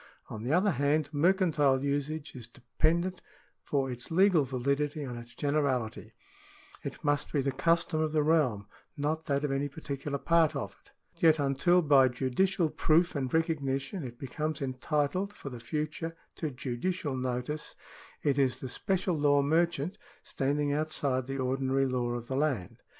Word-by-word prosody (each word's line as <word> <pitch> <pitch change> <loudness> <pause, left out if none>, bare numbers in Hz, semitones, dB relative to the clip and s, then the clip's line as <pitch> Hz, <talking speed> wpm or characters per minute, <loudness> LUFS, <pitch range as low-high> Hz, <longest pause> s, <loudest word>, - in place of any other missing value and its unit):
On 110 - -6
the 120 +4 -2
other 185 +5 +4
hand, 145 0 +1
mercantile 150 -5 +3
usage 145 +2 -2
is 120 -3 -9
dependent 165 +9 -1 0.4
for 135 -2 -1
its 120 0 -5
legal 180 -2 +4
validity 140 +3 -1
on 125 -2 -5
its 120 0 -10
generality; 140 -6 -1 0.7
it - - -7
must 145 -1 0
be 145 - +1
the 135 +1 0
custom 165 +3 +1
of 155 -1 0
the 155 -1 +2
realm, 145 -10 +2 0.3
not 155 +3 -2
that 140 -1 0
of 145 - 0
any 140 +1 -1
particular 140 -1 -4
part 165 +1 +3
of - - -4
it; - - -23 0.3
yet 160 -2 +6
until, 145 +6 +3
by 140 -3 +6
judicial 155 +8 0
prooi 165 +2 +3
and 130 -3 -2
recognition, 155 0 -1
it 120 -2 -7
becomes 150 +4 -3
entitled 150 +8 -1
for 140 - -8
the 120 - -7
future 155 +6 -3 0.2
to 155 - -2
judicial 140 +4 -3
notice, 130 +4 -3 0.5
it 140 -1 +2
is 130 -2 +2
the 130 - -5
special 185 +5 0
law 145 -1 +3
merchant, 170 +4 +1 0.2
standing 145 +1 0
outside 145 -4 0
the 135 0 -3
ordinary 135 +1 +1
law 125 -2 -1
of 120 -1 -4
the 130 - -4
land. 135 - -1
145 Hz, 160 wpm, -30 LUFS, 130-160 Hz, 0.7 s, yet